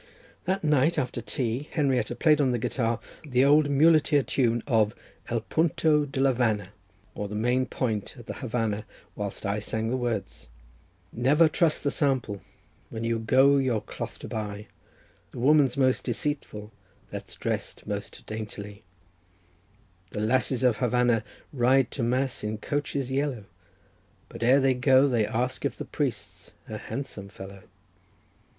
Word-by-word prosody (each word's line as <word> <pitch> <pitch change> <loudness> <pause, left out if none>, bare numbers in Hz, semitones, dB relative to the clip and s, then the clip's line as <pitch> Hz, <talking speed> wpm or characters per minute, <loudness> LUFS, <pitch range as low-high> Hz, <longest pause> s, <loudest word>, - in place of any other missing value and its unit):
That 190 0 -1
night, 150 +2 +3
after 125 -1 -2
tea, 120 +5 -2
Henrietta 135 -5 0
played 150 +3 +4
on 135 - +3
the 125 - +1
guitar 115 0 -1 0.2
the 130 -3 +2
old 145 +1 +5
muleteer 150 0 +4
tune 120 -3 +1
of 110 -5 +2 0.3
"El 115 -1 0
Punto 155 +1 +2
de 135 -1 -5
la 135 0 +4
Vana," 110 -6 0 0.4
or 105 - -4
the 105 - -6
main 125 +4 +1
point 110 -3 -2
at 120 - -11
the - - -5
Havanna, 115 -4 -2 0.3
whilst 100 -1 -5
I 100 +1 0
sang 110 +2 -2
the 125 - 0
words:— 120 -5 -3 0.7
"Never 145 +7 +4
trust 155 0 +1
the 140 - +1
sample 130 -9 0 0.5
when 115 0 -5
you 115 0 0
go 130 +5 +5
your 130 -5 +1
cloth 105 - -7
to - - -9
buy: 105 -1 -5 0.7
The - - -9
woman's 140 0 +4
most 130 -1 +2
deceitful 120 -4 -3 0.4
that's - - -8
dressed - - -4
most - - -6
daintily, 105 -2 -7 1.3
The 105 - -2
lasses 130 +3 +1
of 125 -4 +3
Havanna 125 -2 +2 0.3
ride 130 0 +3
to 135 - -4
mass 125 +2 0
in 105 0 -2
coaches 140 +1 -2
yellow, 135 -5 -1 0.9
But - - -10
ere 125 +4 +5
they 135 -1 +3
go 130 +2 +4
they 115 -5 +1
ask 125 +3 -2
if - - -2
the - - -5
priest's - - -4
a - - -6
handsome 110 -8 -6
fellow. 95 0 -10
125 Hz, 150 wpm, -27 LUFS, 110-140 Hz, 1.3 s, old